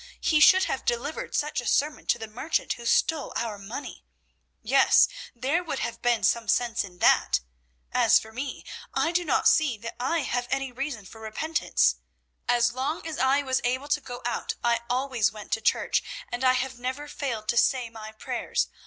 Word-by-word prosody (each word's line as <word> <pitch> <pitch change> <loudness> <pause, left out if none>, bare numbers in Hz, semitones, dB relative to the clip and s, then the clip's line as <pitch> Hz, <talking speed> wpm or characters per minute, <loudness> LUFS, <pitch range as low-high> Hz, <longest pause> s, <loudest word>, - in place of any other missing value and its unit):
He 310 - +2
should 375 +5 +7
have 270 - -2
delivered 240 +6 -2
such 300 -3 0
a 240 - -7
sermon 295 +2 0
to - - +3
the 225 - -6
merchant 250 +9 -1
who 235 -1 -8
stole 310 +4 +1
our 215 -3 -3
money. 215 +8 -7 0.6
Yes, - - +5 0.3
there 275 +9 0
would 310 -5 -4
have 235 - -4
been 240 -2 +1
some 235 -2 +2
sense 235 +1 +1
in 180 -3 -12
that. 65 - +4 0.5
As - - +5
for 220 - -5
me, 260 +4 -6 0.3
I 325 - +2
do 350 +1 +1
not 300 - +2
see 290 -8 +3
that 230 +2 -7
I 315 +7 0
have 245 -3 -2
any 270 -1 -1
reason 255 -4 -5
for 220 +3 -13
repentance. 300 +9 +1 0.5
As 240 -1 +3
long 275 +7 -3
as 320 -2 -5
I 265 +3 +3
was 260 -1 0
able 260 +4 -1
to 295 +1 +1
go 245 -2 -8
out 240 - -2
I 235 -1 +2
always 250 -5 +1
went 210 -1 -11
to 225 - 0
church, - - +1 0.3
and 245 +1 -3
I 255 -1 +5
have 255 -1 -2
never 260 +4 -4
failed 235 -7 -4
to - - +2
say 250 0 +3
my 220 -1 -9
prayers. 220 - -2
250 Hz, 190 wpm, -26 LUFS, 230-285 Hz, 0.6 s, should